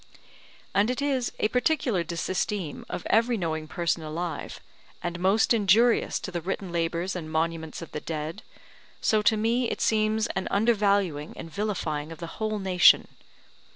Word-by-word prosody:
And 205 +3 +3
it 250 - -1
is 270 -4 0
a - - +2
particular 250 - +1
disesteem 175 0 -3
of - - -5
every 230 +2 +3
knowing 160 -4 -2
person 170 +1 -1
alive, 160 +2 -5 0.4
and 175 +1 -3
most 195 +6 +3
injurious 225 +2 +3
to 185 - -5
the 175 -1 -3
written 190 +1 -4
labours 170 +2 -1
and 160 -3 -5
monuments 160 0 -2
of 165 - -11
the 150 - -5
dead, 160 +5 -4 0.6
so 215 -1 +2
to 215 +1 +3
me 230 +3 +1
it - - -3
seems 215 0 +2
an 190 - -2
undervaluing 200 -8 +1
and 165 - -8
vilifying 165 -7 -2
of 165 - -8
the 170 +4 -9
whole 215 0 0
nation. 190 -2 +5
190 Hz, 155 wpm, -27 LUFS, 165-215 Hz, 0.6 s, nation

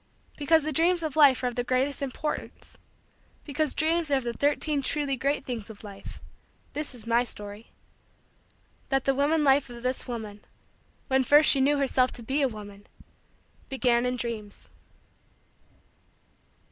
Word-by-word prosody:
Because 315 +2 +3
the 310 +1 -2
dreams 340 +3 +3
of 310 -4 -3
life 280 -4 +5
are - - +2
of 245 - -3
the 245 - -2
greatest 260 +3 0
importance 280 +3 -5 0.7
because 300 0 -1
Dreams 325 +1 +1
are 280 - +3
of 265 - 0
the 235 0 -3
Thirteen 290 +2 0
Truly 280 0 0
Great 275 +3 -1
Things 230 -5 -5
of 220 -1 -11
Life 200 -2 -10 0.5
this 295 -3 -3
is 230 -3 -10
my 235 +1 +3
story: 210 -2 -8 1.2
that 270 -1 +1
the 275 - +3
woman 295 +3 +2
life 275 -1 +3
of 240 0 -10
this 255 +1 -2
woman, 215 -4 -6 0.7
when 265 -1 +2
first 295 +4 +6
she 275 - +3
knew 290 +2 +3
herself 260 -2 +2
to 240 - -10
be 270 +6 -1
a 275 - +4
woman, 205 -3 -10 0.8
began 250 -2 +2
in 250 - -1
dreams. 225 -4 -6
265 Hz, 160 wpm, -27 LUFS, 235-290 Hz, 1.2 s, first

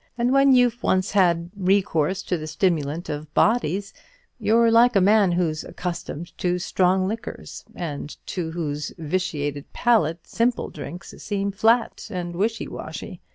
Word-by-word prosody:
And 240 +1 +1
when 275 0 +5
you've 245 -1 +3
once 185 +1 +1
had 175 -3 +2
recourse 190 -2 +1
to 180 - -1
the 155 -2 -5
stimulant 160 -1 -1
of 150 0 -5
bodies, 200 -3 +1 0.5
you're 230 +1 +4
like 235 +1 +5
a - - +6
man 200 -1 +4
who's 165 -3 0
accustomed 175 -1 -6
to 180 0 +1
strong 185 +1 +1
liquors, 225 +4 -6
and 150 -4 -5
to 175 -4 -3
whose 150 -3 -3
vitiated 150 -4 -3
palate 170 -9 +2
simple 235 +1 0
drinks 175 +2 -8
seem 200 -1 -2
flat 225 +4 +1
and 175 -4 -4
wishy 220 +5 -1
washy. - - -8
185 Hz, 145 wpm, -23 LUFS, 165-215 Hz, 0.5 s, a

